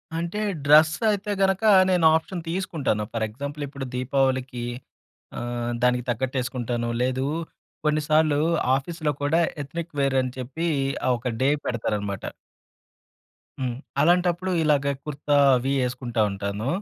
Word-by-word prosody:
అంటే 170 +5 -3 0.3
డ్రెసైతే 190 +8 +4
గనక 195 +2 +2 0.3
నేను 180 -3 +3
ఆప్షన్ 170 +2 -2
తీసుకుంటాను. 160 - -1
ఫర్ 115 -1 0
ఎగ్జాంపుల్ 140 +6 -6
ఇప్పుడు 140 -1 -6
'దీపావళికి' 130 -1 0 0.7
ఆహ్, 120 0 -3
దానికి 125 -1 +2
తగ్గట్టు 130 +3 -1
ఎసుకుంటాను. 120 -2 -3
లేదు 130 +1 0 0.6
కొన్నిసార్లు 150 0 +2 0.4
ఆఫీస్‌లో 155 +2 -3
కూడా 160 +4 +3 0.2
ఎత్నిక్ 165 +3 -7
వేర్ 135 -1 +2
అని 130 - -3
చెప్పి 140 +7 -3 0.4
ఆ - - +3
ఒక 125 0 -3
డే 135 - +4 0.2
పెడతారన్నమాట. 105 -4 -2 1.3
హ్మ్. 125 -2 -2 0.2
అలాంటప్పుడు 180 +2 +2
ఇలాగ 145 -2 +2 0.2
కుర్తా 145 0 -1 0.2
అవి 130 +2 -1
ఎసుకుంటా 125 -2 -2
ఉంటాను. 100 +3 -4
135 Hz, 120 wpm, -24 LUFS, 125-160 Hz, 1.3 s, డ్రెసైతే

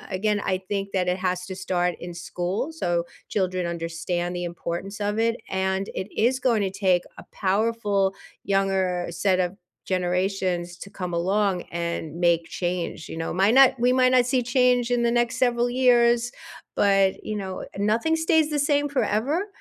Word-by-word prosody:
again, 210 +2 +1
I 185 -1 0
think 200 -1 -2
that 180 -1 +1
it 180 - 0
has 180 -1 -2
to 190 - -6
start 180 -2 0
in 175 0 -7
school, 175 - -3
so, 175 - -1 0.2
children 185 -2 -1
understand 170 +1 -3
the 175 0 -3
importance 175 +4 -5
of 205 +1 -1
it, 230 +1 +1
and 190 +1 -1
it 185 - -4
is 250 +4 +2
going 240 -4 +2
to 195 -2 -1
take 185 -2 +2
a - - -10
powerful 200 -1 +1 0.3
younger 190 -2 +1
set 185 +2 +1
of 180 +2 -3 0.3
generations 180 -1 -1
to 200 - -10
come 180 -3 -5
along 190 +1 +1
and 170 -2 -3
make 170 -1 +3
change, 175 0 -3
you - - -6
know. 165 - -3
Might 195 +6 +3
not 265 -1 +7
we 245 +1 +3
might 255 0 +4
not 250 -1 +5
see 255 0 +1
change 250 -1 +2
in 240 -1 +2
the 235 - +2
next 240 +1 +1
several 240 -1 +2
years, 240 -1 +3 0.4
but, 195 -1 +3
you 215 - -3
know, 190 -2 -4
eh - - -10
nothing 225 +10 +2
stays 320 -1 +2
the 300 -1 -1
same 290 0 +2
forever. 280 - 0
195 Hz, 180 wpm, -25 LUFS, 180-235 Hz, 0.4 s, not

